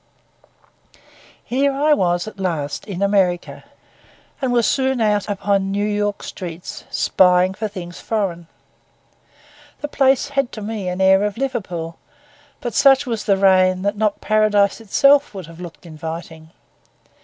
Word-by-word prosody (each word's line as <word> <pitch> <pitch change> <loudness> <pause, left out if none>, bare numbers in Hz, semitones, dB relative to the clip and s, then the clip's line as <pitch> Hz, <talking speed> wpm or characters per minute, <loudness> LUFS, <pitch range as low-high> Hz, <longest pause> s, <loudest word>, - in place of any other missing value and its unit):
Here 275 +3 +1
I 295 +3 +2
was 175 -6 0
at 215 - -10
last 160 -6 -3
in 195 -1 -3
America, 190 -3 0 0.8
and 260 -2 0
was 240 -2 +2
soon 265 -1 +1
out 210 -2 +1
upon 195 -1 0
New 205 +1 0
York 205 -1 -1
streets, 175 -2 -8
spying 180 0 +3
for 215 +3 -3
things 180 -4 -8
foreign. 185 -6 -3 1.3
The 295 - -2
place 270 -2 +2
had 275 -3 -1
to 215 - -7
me 210 -3 -4
an 180 +1 -3
air 190 +1 +5
of 210 +1 -2
Liverpool; 190 -11 -4 0.6
but 240 - -4
such 275 0 +5
was 230 -4 -3
the 200 -2 +3
rain 185 -1 +3
that 200 +1 0
not 210 -1 -1
Paradise 215 -1 +2
itself 275 +3 +3
would 190 -3 -6
have 165 +2 -13
looked 175 0 -10
inviting. 160 0 -8
200 Hz, 145 wpm, -20 LUFS, 180-225 Hz, 1.3 s, air